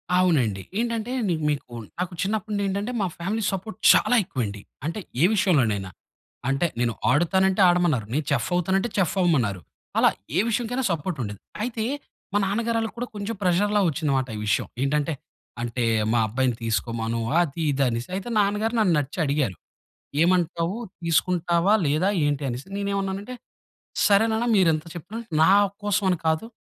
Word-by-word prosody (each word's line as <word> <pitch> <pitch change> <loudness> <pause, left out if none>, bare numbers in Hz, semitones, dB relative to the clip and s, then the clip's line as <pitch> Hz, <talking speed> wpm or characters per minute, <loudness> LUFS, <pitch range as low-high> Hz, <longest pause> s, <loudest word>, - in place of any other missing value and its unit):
అవునండి. 135 - +2 0.2
ఏంటంటే 230 0 -2
అండి 200 -6 0 0.2
మీకు 145 -4 -3 0.3
నాకు 180 0 -2
చిన్నప్పుడు 215 +2 -2
నుండీ 200 -1 0
ఏంటంటే 200 +5 -2
మా 195 - +1
ఫ్యామిలీ 205 +6 -2
సపోర్ట్ 195 +3 -5 0.2
చాలా 245 - +3
ఎక్కువ 140 - -3
అండి. 100 0 -6 0.2
అంటే 165 +6 -3 0.2
ఏ - - +5
విషయంలోనైనా. 115 - +2 0.6
అంటే 135 +6 +1
నేను 120 -1 +1 0.2
ఆడుతాను 175 +6 +3
అంటే 190 +1 +1
ఆడమన్నారు. 175 -10 +2
నేను 150 +2 0
చెఫ్ 135 -4 +1
అవుతాను 185 +2 +1
అంటే 240 - -2
చెఫ్ 190 -2 +1
అవ్వమన్నారు. 120 - +1 0.4
అలా - - +6 0.3
ఏ - - +5
విషయంకైనా 245 +3 -1
సపోర్ట్ 170 +1 -2
ఉండేది. 105 -2 -6 0.2
అయితే 230 -2 -2 0.5
మా - - +3
నాన్న 200 +4 0
గారోళ్ళకి 225 -1 0
కూడా 245 +1 -3
కొంచెం 205 +2 -4
ప్రెషర్‌‌లా 205 +4 +2
వచ్చింది 155 -1 -1
మాట 130 -1 -1
ఈ - - -5
విషయం. 105 - +1 0.2
ఏంటంటే 150 +3 0 0.5
అంటే 120 +1 -2 0.3
మా 120 - +3
అబ్బాయిని 125 +2 0
తీసుకోమను 115 +1 -1 0.2
అది 165 -1 -2
ఇది 140 0 +1
అనేసి. 120 +5 -3
అయితే 195 +5 -4
నాన్నగారు 210 +3 +1
నన్నచ్చి 165 -9 +1
అడిగారు. 140 -8 0 0.7
ఏమంటావు 175 +1 +1 0.3
తీసుకుంటావా 170 +2 +2
లేదా 155 +7 +2 0.2
ఏంటి 145 -1 0
అనేసి, 125 +2 -5
నేనేమన్నా‌నంటే 200 +3 -2 0.7
సరే 200 +1 +5
నాన్న 225 +2 0
మీరు 185 -3 +5
ఎంత 155 +1 -4
చెప్పిన, 180 +6 -8 0.3
నా 160 - +6 0.3
కోసం 205 0 +1
అని 180 - +1
కాదు 160 +6 +1
175 Hz, 160 wpm, -24 LUFS, 140-200 Hz, 0.7 s, అలా